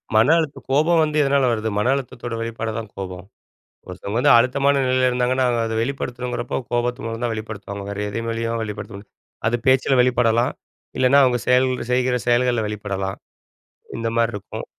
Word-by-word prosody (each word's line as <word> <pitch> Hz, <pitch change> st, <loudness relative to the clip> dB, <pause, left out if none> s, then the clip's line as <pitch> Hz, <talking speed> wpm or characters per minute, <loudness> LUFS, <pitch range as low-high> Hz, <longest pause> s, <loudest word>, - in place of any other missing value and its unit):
மன 110 Hz, +5 st, +5 dB
அழுத்த 155 Hz, -3 st, -3 dB
கோபம் 160 Hz, +5 st, +3 dB
வந்து 155 Hz, 0 st, -1 dB
எதனால 140 Hz, -1 st, +3 dB
வருது, 110 Hz, -1 st, -1 dB
மன 105 Hz, +3 st, +1 dB
அழுத்தத்தோட 125 Hz, -3 st, -5 dB
வெளிப்பாடுதான் 115 Hz, -1 st, -4 dB
கோபம். 95 Hz, -2 st, -6 dB, 0.6 s
ஒருத்தவங்க 100 Hz, +4 st, -5 dB
வந்து -, -, +5 dB
அழுத்தமான 140 Hz, +3 st, +2 dB
நிலையில 130 Hz, 0 st, +2 dB
இருந்தாங்கன்னா, 125 Hz, +1 st, +1 dB
அவங்க 120 Hz, -1 st, +1 dB
அத 110 Hz, -, -3 dB
வெளிப்படுத்தணுங்கிறப்போ 125 Hz, -1 st, -3 dB
கோபத்து 120 Hz, +2 st, -1 dB
மூலம் 115 Hz, +1 st, -4 dB
தான் 120 Hz, -2 st, 0 dB
வெளிப்படுத்துவாங்க. 100 Hz, -2 st, -6 dB
வேற 100 Hz, 0 st, -5 dB
எது 115 Hz, +3 st, -4 dB
வழியாவும் 115 Hz, 0 st, -2 dB
வெளிப்படுத்த 105 Hz, -2 st, -7 dB
முடியாது. -, -, -13 dB, 0.5 s
அது 120 Hz, -, 0 dB
பேச்சில் 130 Hz, 0 st, +4 dB
வெளிப்படலாம், 120 Hz, -1 st, +2 dB, 0.4 s
இல்லைன்னா 130 Hz, +2 st, +5 dB
அவங்க 125 Hz, -2 st, +2 dB
செயல் 125 Hz, +1 st, +4 dB, 0.2 s
செய்கிற 125 Hz, 0 st, +2 dB
செயல்களில 120 Hz, -2 st, +2 dB
வெளிப்படலாம். 100 Hz, -2 st, -4 dB, 0.8 s
இந்த 115 Hz, 0 st, -2 dB
மாதிரி 115 Hz, 0 st, +2 dB
இருக்கும். 100 Hz, -, -7 dB
120 Hz, 160 wpm, -21 LUFS, 110-130 Hz, 0.8 s, மன